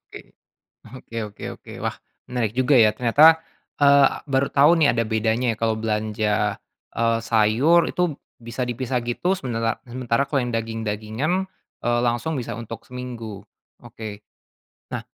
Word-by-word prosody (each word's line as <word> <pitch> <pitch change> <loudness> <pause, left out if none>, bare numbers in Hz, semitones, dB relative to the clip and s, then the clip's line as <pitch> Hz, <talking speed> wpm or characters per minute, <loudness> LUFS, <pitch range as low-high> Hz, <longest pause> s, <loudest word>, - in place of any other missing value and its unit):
Oke. - - -14 0.6
Oke 115 -2 -11
oke 100 - -11
oke. - - -13
Wah, - - -2 0.3
menarik 120 -4 -1
juga, 130 +2 +3
ya. 110 -2 +6
Ternyata, 155 +8 +6 0.4
eee, 140 -1 +7 0.2
baru 135 -1 +1
tahu 140 +2 +5
nih, 150 - +5
ada 115 - +1
bedanya 110 +2 0
ya, - - -7
kalau 115 -1 +1
belanja, 105 -1 -1 0.4
eee, 115 0 +1
sayur 115 +9 +3
itu 175 -5 0 0.2
bisa 115 +2 -5
dipisah 125 0 -2
gitu, 150 +10 0
semenela 115 -6 -2
sementara 125 +1 -1
kalau 140 -1 0
yang 120 -1 -3
daging-dagingan, 115 - -2 0.4
eee, 120 0 +2
langsung 120 +6 -1
bisa 120 -2 -4
untuk 115 0 -8
seminggu. 120 -5 -7 0.4
Oke. 105 -2 -9 0.7
Nah - - -4
120 Hz, 140 wpm, -23 LUFS, 110-135 Hz, 0.7 s, eee